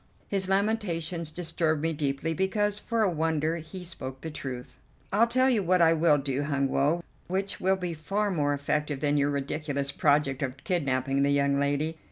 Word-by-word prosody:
His 190 -2 -1
lamentations 185 -5 0
disturbed 160 -1 -1
me 165 0 +1
deeply, 145 +2 -1
because, 205 +3 +1
for 230 0 0
a 205 - +3
wonder, 160 0 0
he 170 +3 -8
spoke 135 -7 -6
the 160 - -5
truth. 130 -4 -6 0.4
"I'll 225 +4 +5
tell 255 +2 +3
you 240 -5 +3
what 185 0 +2
I 165 -1 +6
will 160 -2 +4
do, 135 -1 -2
Hun 140 -2 0
Woe, 150 +7 +1 0.2
which 195 +2 -2
will 190 +1 +3
be 180 -2 -3
far 200 +6 -1
more 145 -4 +1
effective 145 0 -1
than 145 +1 +1
your 145 0 +2
ridiculous 140 0 -2
project 145 -1 +2
of 130 -1 -2
kidnapping 135 -5 0
the 140 - +3
young 140 0 +2
lady. 145 +3 0
155 Hz, 185 wpm, -28 LUFS, 140-185 Hz, 0.4 s, I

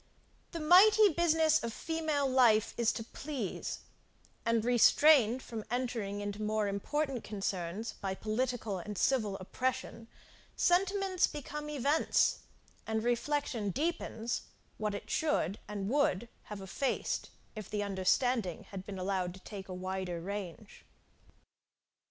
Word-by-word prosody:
The 335 - -5
mighty 400 +7 +7
business 320 -3 +3
of 230 - -2
female 310 -1 -1
life 240 -5 +4
is 235 -1 +2
to 225 - -4
please, 255 -3 -5 0.7
and, 230 -1 +2
restrained 245 0 +5
from 225 -2 -6
entering 230 -5 -2
into 205 +1 -4
more 215 0 0
important 265 +6 -2
concerns 195 +1 -3
by 190 -1 -2
political 220 -2 -2
and 205 +3 -6
civil 215 -6 +1
oppression, 250 +3 -3 0.5
sentiments 380 +1 +2
become 300 0 -6
events, 290 +2 +2 0.5
and 220 0 -1
reflection 240 -2 0
deepens 250 - -2 0.4
what 210 -1 -1
it - - -7
should, 215 - 0
and 200 -1 -4
would 240 -4 +1 0.2
have 210 -2 -7
effaced, 195 +8 -2 0.3
if 215 -3 -7
the 210 -1 -1
understanding 200 +1 +1
had 190 -2 -6
been 195 -1 -7
allowed 185 -1 -2
to - - -12
take 195 -2 -9
a - - -4
wider 185 -1 -3
range. 200 +2 -7
225 Hz, 125 wpm, -32 LUFS, 200-285 Hz, 0.7 s, mighty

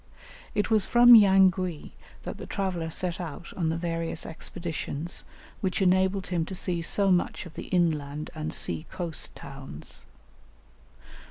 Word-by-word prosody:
It 210 - 0
was 215 -3 +3
from 240 0 +8
Yangui 190 -5 +5 0.3
that - - -6
the - - -7
traveller 185 -5 -2
set 175 +1 -2
out 170 0 -7
on 165 -3 0
the 165 - -1
various 165 -1 -2
expeditions 165 -1 -5 0.4
which 185 -2 -1
enabled 190 0 +2
him 170 -2 +1
to 190 - -6
see 175 -1 -1
so 195 +3 +2
much 175 -1 0
of 170 - -11
the - - -7
inland 155 -4 0
and 155 -1 -4
sea 155 - -2
coast 170 -4 -3
towns. 135 - -10
175 Hz, 145 wpm, -27 LUFS, 160-190 Hz, 0.4 s, from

